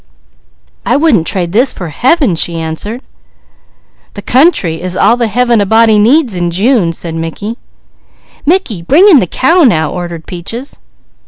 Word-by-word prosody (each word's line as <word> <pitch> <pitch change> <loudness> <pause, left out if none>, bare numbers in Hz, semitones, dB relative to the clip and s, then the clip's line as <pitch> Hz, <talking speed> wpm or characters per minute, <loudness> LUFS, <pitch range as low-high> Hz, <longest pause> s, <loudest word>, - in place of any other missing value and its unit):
"I - - 0
wouldn't 280 - +1
trade 175 -3 -2
this 245 +7 +2
for 175 -3 -7
Heaven!" 255 - +1
she 165 +1 -1
answered. 165 +10 -5 1.1
"The 205 - -8
country 240 - +1
is 185 0 -4
all 235 - +3
the 240 -1 -1
Heaven 240 +1 +1
a - - +1
body 220 0 +3
needs, 250 +3 +2
in 175 -1 -2
June." 195 0 +1 1.5
"Mickey, 290 - 0
bring 300 - +4
in 340 -9 +6
the 185 - -1
cow 330 - +1
now!" 160 - +1
ordered 175 -2 -7
Peaches. 225 - -7
220 Hz, 145 wpm, -11 LUFS, 175-260 Hz, 1.5 s, in